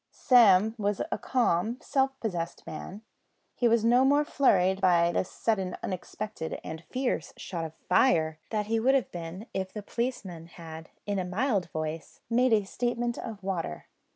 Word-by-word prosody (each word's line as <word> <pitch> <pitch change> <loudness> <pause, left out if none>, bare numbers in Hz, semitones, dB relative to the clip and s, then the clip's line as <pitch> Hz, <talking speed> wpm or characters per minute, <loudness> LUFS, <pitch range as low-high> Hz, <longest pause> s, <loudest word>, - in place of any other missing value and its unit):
Sam 220 -4 +5
was 205 -1 0
a - - -1
calm, 230 -2 +1
self 270 -1 0
possessed 175 -7 -4
man. 190 +7 -8 0.5
He 245 - +2
was 230 -1 +3
no 245 +2 +5
more 285 +2 +4
flurried 190 -10 +3
by 170 -2 +4
this 180 - -1
sudden, 195 -5 -1
unexpected, 185 -1 -5
and 160 0 -6
fierce 255 +7 -2
shout 170 -3 -4
of 160 0 -8
"Fire," 160 -6 +3
than 210 -2 -1
he 225 +2 0
would 265 +4 +4
have 255 -8 0
been 175 +4 -7
if 190 0 -3
the 210 - -7
policeman 195 -8 -4
had 160 -2 -10 0.2
in 205 -1 -1
a - - -1
mild 195 -1 0
voice 155 +1 -5
made 250 +2 +3
a 215 -2 +4
statement 240 +3 -2
of 220 -4 -7
water. 175 - -3
200 Hz, 165 wpm, -28 LUFS, 175-235 Hz, 0.5 s, Sam